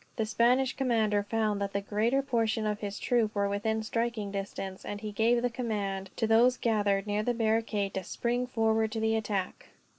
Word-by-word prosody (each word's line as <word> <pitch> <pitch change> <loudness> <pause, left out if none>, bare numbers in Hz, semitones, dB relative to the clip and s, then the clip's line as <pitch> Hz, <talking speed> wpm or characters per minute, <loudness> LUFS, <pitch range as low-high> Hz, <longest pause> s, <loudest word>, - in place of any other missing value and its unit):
The 225 - 0
Spanish 245 +4 +2
commander 225 -6 +1
found 210 -1 -1
that 200 0 -2
the 200 - +1
greater 225 +7 +1
portion 225 -4 0
of 210 -1 -1
his 205 -1 -5
troop 225 -3 +1
were 200 0 +1
within 220 +2 -1
striking 230 -2 -2
distance, 195 -1 -5
and 205 - -5
he 210 0 -5
gave 230 +3 +2
the 245 - +2
command, 200 -5 -3
to - - 0
those 235 +3 +4
gathered 205 -3 +1
near 205 0 0
the 240 +2 0
barricade, 220 -3 0
to 190 - -3
spring 245 +6 -1
forward 220 -2 +1
to 225 - -2
the 220 0 +1
attack. 205 -4 -3
220 Hz, 190 wpm, -29 LUFS, 205-235 Hz, -, those